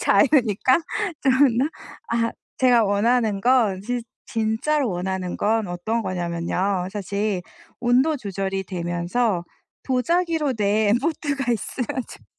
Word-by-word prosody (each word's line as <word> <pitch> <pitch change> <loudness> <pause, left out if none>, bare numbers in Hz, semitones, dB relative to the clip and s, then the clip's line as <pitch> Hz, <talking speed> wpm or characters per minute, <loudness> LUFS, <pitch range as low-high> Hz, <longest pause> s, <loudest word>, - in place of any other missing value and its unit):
자유니까. 260 - +4 0.4
좀 265 - +4
그렇나. 265 0 +4 0.4
아 230 0 0 0.3
제가 245 -3 +5
원하는 210 +1 +2
건 225 -5 +3
진 245 +3 -2 0.3
진짜로 230 +5 0
원하는 180 0 -3
건 220 -1 +1
어떤 195 +7 -2
거냐면요, 180 +1 -1
사실 200 -1 -2 0.4
온도 255 +6 +3
조절이 195 -4 -3
되면서 175 +3 -1 0.4
도자기로 315 +2 +1
된 210 +1 +2
포트가 280 -4 -1
있으면 235 +3 -3 0.2
좋죠. - - -14
220 Hz, 250 characters per minute, -23 LUFS, 195-255 Hz, 0.4 s, 제가